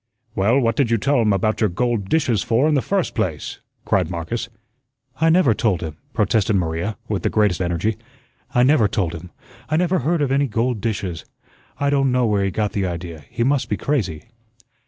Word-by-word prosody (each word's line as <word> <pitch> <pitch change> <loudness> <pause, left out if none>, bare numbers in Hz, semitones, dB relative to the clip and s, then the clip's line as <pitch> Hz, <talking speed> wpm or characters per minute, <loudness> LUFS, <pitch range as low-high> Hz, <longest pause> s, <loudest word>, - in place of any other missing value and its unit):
"Well, 110 +7 +3
what 115 -3 +1
did 135 -3 +1
you 115 - +3
tell 135 +3 +2
him 110 -2 +2
about 110 +3 0
your 110 - +3
gold 110 +1 -1
dishes 130 -9 +2
for 120 +6 +2
in 155 - +2
the 140 - +3
first 195 +3 -1
place?" 90 - -3 0.3
cried - - +1
Marcus. 85 +8 -4 0.7
"I 165 +1 +3
never 160 -8 +4
told 105 -5 0
him," 80 -3 -6
protested 105 -1 +1
Maria, 85 +3 -1
with 105 -3 -2
the - - 0
greatest 105 -5 +1
energy. 90 +5 -1 0.5
"I 125 - +3
never 130 -5 +4
told 90 -5 -1
him; 85 +2 -8 0.4
I 155 - +1
never 180 +2 +2
heard 155 +3 +1
of 135 - -1
any 140 +1 +2
gold 115 0 -1
dishes. 100 -7 -3 0.6
I 140 0 +1
don' 135 -2 +2
know 125 -1 +2
where 105 -3 +1
he 100 - +1
got 105 +2 -1
the 100 -2 -1
idea; 85 -3 -6
he 115 - -1
must 135 -2 +1
be 105 - 0
crazy." 100 - -1
110 Hz, 200 wpm, -21 LUFS, 95-135 Hz, 0.7 s, never